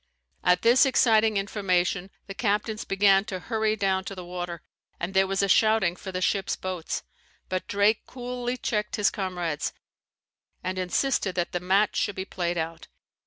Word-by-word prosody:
At 180 0 +3
this 235 +3 +6
exciting 225 -5 +4
information 195 -2 0 0.2
the 195 - -7
captains 210 +1 -1
began 195 0 +4
to 195 -5 -4
hurry 220 +1 0
down 190 -2 0
to 195 - -6
the 180 -1 -8
water, 175 -1 -5 0.4
and 175 +3 -3
there 190 0 +4
was 195 +1 0
a - - +2
shouting 215 -3 +3
for 190 +1 -8
the 185 0 -3
ship's 195 +1 +1
boats: 185 -3 -4 0.5
but 185 0 -2
Drake 205 +2 +2
coolly 245 0 -4
checked 210 -3 -2
his 205 -2 +2
comrades, 175 -7 -3 0.9
and 185 +1 -2
insisted 190 +2 0
that 175 -1 -1
the 175 - -1
match 195 +4 +2
should 205 - 0
be 190 - -4
played 175 -2 -2
out. 165 0 -4
195 Hz, 165 wpm, -26 LUFS, 180-215 Hz, 0.9 s, this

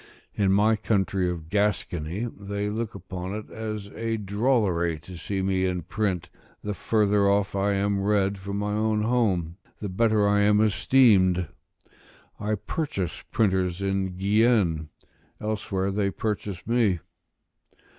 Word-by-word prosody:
In 100 -2 +2
my 105 +3 +4
country 95 -4 0
of 85 -3 -5
Gascony, 100 -1 -1
they 100 -2 -4
look 110 0 -3
upon 95 0 -6
it 110 - -7
as 110 -2 -5
a 115 0 -2
drollery 100 -6 +1
to 90 +2 -11
see 95 +3 -3
me 95 -1 +1
in 90 -2 -1
print; 95 -2 -2 0.4
the 105 - -2
further 105 -1 +2
off 100 0 +1
I 100 +1 +1
am 100 0 0
read 100 -1 +1
from 100 +1 -4
my 105 0 -1
own 110 0 +1
home, 100 -8 +1 0.2
the 105 - -4
better 110 +1 +2
I 105 0 +3
am 105 0 +4
esteemed. 100 -5 +4 0.9
I 105 +1 0
purchase 100 - -3
printers 95 -4 +1
in 95 -2 -1
Guienne; 100 -6 +2 0.5
elsewhere 100 -3 -2
they 100 0 0
purchase 100 -3 -4
me. 115 -6 +2
100 Hz, 135 wpm, -26 LUFS, 95-105 Hz, 0.9 s, my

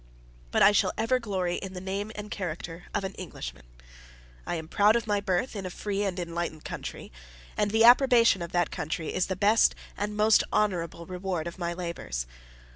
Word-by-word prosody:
But - - +3
I 205 - +8
shall 205 - +2
ever 240 +4 +2
glory 190 -6 -1
in 190 -1 -6
the 180 - -5
name 195 +3 -4
and 210 0 -7
character 175 -2 -5
of - - -1
an 190 0 -4
Englishman: - - -8 0.8
I - - -1
am 160 -1 -5
proud 205 +5 +4
of 235 - 0
my 205 -2 +1
birth 200 +5 -1
in 200 - -4
a 185 - -4
free 200 +2 -3
and 190 -2 -2
enlightened 170 -2 -4
country; - - -6 0.4
and 210 - +1
the 220 +2 +3
approbation 240 -4 +6
of 170 - -5
that 175 -2 +1
country 160 +1 -3
is 185 - +1
the 190 - -2
best 210 +4 +4 0.2
and 210 +1 -3
most 215 0 +5
honorable 170 -5 0
reward 180 -2 -3
of 170 +2 -7
my 170 -1 -2
labors. 170 - -4
190 Hz, 195 wpm, -28 LUFS, 170-210 Hz, 0.8 s, I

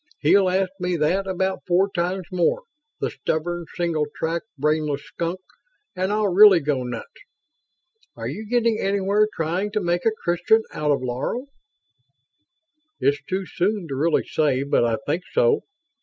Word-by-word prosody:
He'll 195 -2 +4
ask 190 0 +1
me 180 0 -1
that 180 +6 +1
about 190 0 -1
four 185 +2 +3
times 180 +1 -1
more, 185 - +1 0.4
the - - -2
stubborn, 170 +2 -2
single 165 -4 0
tracked, 165 +5 -2
brainless 150 0 0
skunk, 170 +2 -4 0.6
and 185 +2 -1
I'll 210 -3 +1
really 200 -1 +8
go 145 -3 -1
nuts. 125 -2 -5 1.1
Are - - -5
you 215 0 -6
getting 235 -2 +2
anywhere 200 +2 +2
trying 175 +6 -2
to 210 - +1
make 175 +1 0
a - - +4
Christian 175 +6 +3
out 150 0 -2
of 140 -3 +1
Laro?" 135 - -3 1.5
"It's 140 0 +1
too 190 +1 -1
soon 185 +1 -1
to 135 - -3
really 155 +4 +1
say, 145 -4 +1
but 140 -3 +2
I 115 -1 +1
think 160 +5 -1
so." 485 -2 +3
175 Hz, 155 wpm, -23 LUFS, 155-195 Hz, 1.5 s, really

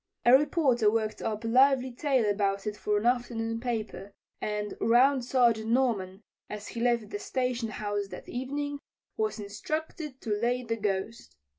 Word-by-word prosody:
A 240 +2 +8
reporter 265 -6 +3
worked 215 0 -1
up 220 0 -3
a - - -2
lively 260 +2 +4
tale 255 -2 +1
about 200 -1 0
it 210 -1 -2
for 210 0 0
an 205 - -2
afternoon 235 -2 0
paper, 225 -4 -4 0.3
and 210 0 -3
Round 255 +3 +4
Sergeant 235 -3 +2
Norman, 220 -6 0 0.3
as 210 0 -6
he 230 - -5
left 235 -2 +1
the 410 - -3
station 250 - -2
house 205 -1 -3
that - - -10
evening, 285 +3 -3 0.4
was 435 - -1
instructed 295 +7 -5
to 225 - -4
"lay 240 +4 0
the 230 -1 -2
Ghost." 205 +2 -3
235 Hz, 160 wpm, -29 LUFS, 210-260 Hz, 0.4 s, A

